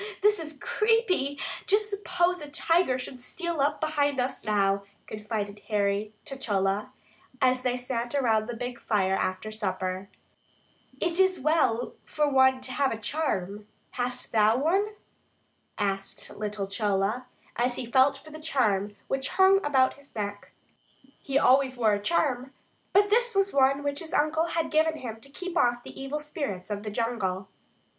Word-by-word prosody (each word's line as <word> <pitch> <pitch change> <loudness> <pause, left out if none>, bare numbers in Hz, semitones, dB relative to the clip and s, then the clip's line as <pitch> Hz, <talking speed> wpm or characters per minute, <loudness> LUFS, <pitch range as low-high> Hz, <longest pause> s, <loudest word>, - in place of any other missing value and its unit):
this 420 -1 +5
is 310 -2 -6
creepy. 425 - +1 0.3
Just 415 +1 +3
suppose 360 -3 0
a 295 - -7
tiger 330 -1 +2
should 250 0 -7
steal 340 +3 -3
up 290 +2 +1
behind 290 -3 +1
us 250 +1 -1
now," 200 -2 +2 0.2
confided 210 -1 -4
Harry 205 0 0
to 270 - -6
Chola, 200 -5 -1 0.5
as 255 -1 +3
they 250 -1 0
sat 245 0 -3
around 225 -5 +2
the 240 - -3
big 245 +1 -5
fire 190 -3 +1
after 195 +3 -1
supper. 190 -2 -3 0.9
"It 345 +1 0
is 375 -1 +4
well 270 -5 +1 0.2
to 260 -3 +3
have 270 +1 +1
a 225 - -2
charm; 210 - -2 0.2
hast 250 0 -3
thou 220 +1 +4
one?" 355 +9 +2 0.9
asked 195 -2 -2
little 210 -1 -3
Chola, 205 +4 0 0.3
as 245 +1 +1
he - - -4
felt 265 +4 +4
for 305 +3 -14
the 310 - -9
charm 210 -10 0
which 270 -1 -1
hung 385 +1 +6
about 265 -3 +3
his 280 -2 -17
neck. 205 -1 -5 0.7
He 275 0 -1
always 260 -1 +4
wore 220 -3 +3
a 205 - -1
charm, 265 -1 0 0.4
but 410 +1 +4
this 475 0 +3
was 390 0 +2
one 275 +1 +3
which 285 0 -1
his 320 -2 -5
uncle 310 +2 +2
had 330 -1 -1
given 315 0 +2
him 225 -4 -7
to 275 - -13
keep 365 +5 -6
off 240 -5 +2
the - - -9
evil 275 +3 -3
spirits 280 - -5
of 205 0 -2
the 210 - -5
jungle. 205 -4 -2
255 Hz, 160 wpm, -27 LUFS, 215-305 Hz, 0.9 s, hung